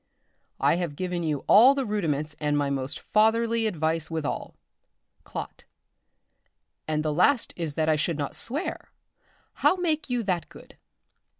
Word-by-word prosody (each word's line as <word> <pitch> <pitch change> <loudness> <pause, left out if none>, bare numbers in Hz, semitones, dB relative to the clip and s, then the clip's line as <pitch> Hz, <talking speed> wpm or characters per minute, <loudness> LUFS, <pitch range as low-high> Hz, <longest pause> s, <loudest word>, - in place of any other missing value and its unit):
_ - - -49 0.6
I - - +3
have 170 -5 -3
given 180 +1 -3
you 155 -4 -2
all 250 +7 +7
the 275 -2 -1
rudiments 155 -8 -2
and 150 -1 0
my 140 -1 0
most 135 -1 -2
fatherly 225 +1 +2
advice 160 -4 -1
withall. 160 -3 -4 0.7
"Clot. - - -7 1.2
And 155 0 -1
the 155 - 0
last 225 - +2
is 160 -4 -4
that 160 -1 0
I 155 -1 +3
should 160 +1 -1
not 145 -2 -3
swear; 285 +9 -4 0.7
how - - +5
make 320 -5 -1
you 245 -2 0
that 185 -4 -2
good? - - -15
170 Hz, 155 wpm, -26 LUFS, 150-225 Hz, 1.2 s, all